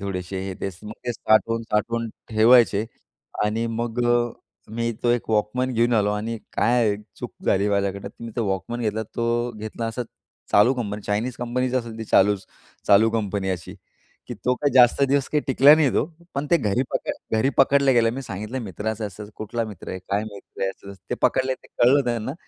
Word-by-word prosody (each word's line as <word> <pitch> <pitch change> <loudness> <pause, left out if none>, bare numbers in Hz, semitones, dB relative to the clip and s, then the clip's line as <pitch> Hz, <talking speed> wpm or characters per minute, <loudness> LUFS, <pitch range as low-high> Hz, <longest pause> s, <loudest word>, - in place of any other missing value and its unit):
थोडेसे, 95 -1 -4
हे 95 - -4
ते. - - -1 0.2
मग 105 - -6
ते 120 - 0
साठवून-साठवून 115 +1 +1 0.2
ठेवायचे. 110 -1 +5 0.6
आणि 110 +2 0
मग 115 +1 -3
अ, 120 -1 +2 0.4
मी 115 +1 -1
तो 120 - +3
एक 120 -2 0
वॉकमन 110 +5 0
घेऊन 120 +1 +2
आलो. 105 -2 +2
आणि 110 +2 -3 0.2
काय 115 -4 +2 0.2
चूक - - -7
झाली 100 +2 +2
माझ्याकडनं 100 0 -1
तर 115 - -12
मी 115 - -6
तो 115 - 0
वॉकमन 95 +5 -3
घेतला. 110 -1 -1
तो 120 +2 -1
घेतला 110 +2 -5
असा 115 +2 -3 0.5
चालू 105 +6 +5
कंपनी. 105 -4 -4
चायनीज 110 +5 -2
कंपनीचा 125 +1 -1
असेल 115 -2 -7
ती 115 - -4
चालूच 100 -1 +3 0.4
चालू 110 +3 +6
कंपनी 100 -3 -1
अशी. 85 -3 -5 0.5
की - - -4
तो 125 - 0
काय 145 +2 0
जास्त 125 +1 +6
दिवस 140 -1 +1
काही 150 - +1
टिकला 135 +2 +7
नाही 155 -4 +3
तो. - - +2 0.3
पण 140 +2 -2
ते 170 - +6
घरी 110 +2 0
पकडला, 110 - -3
घरी 135 +5 +2
पकडला 140 0 +5
गेलो. 115 -2 +4
मी 135 - -5
सांगितलं 110 +4 -5
मित्राचं 105 +2 -4
असं, 105 +1 -10
कुठला 115 +2 -3
मित्र 105 -6 -9
आहे? 95 - -4
काय 100 +3 -2
मित्र 100 -3 -9
आहे? 95 - +1
असं 100 +1 -12 0.2
ते - - +1
पकडले. 130 0 +2
ते - - -20 0.2
कळलं 135 +3 +5
त्यांना. 120 +1 -2
115 Hz, 190 wpm, -23 LUFS, 105-120 Hz, 0.6 s, टिकला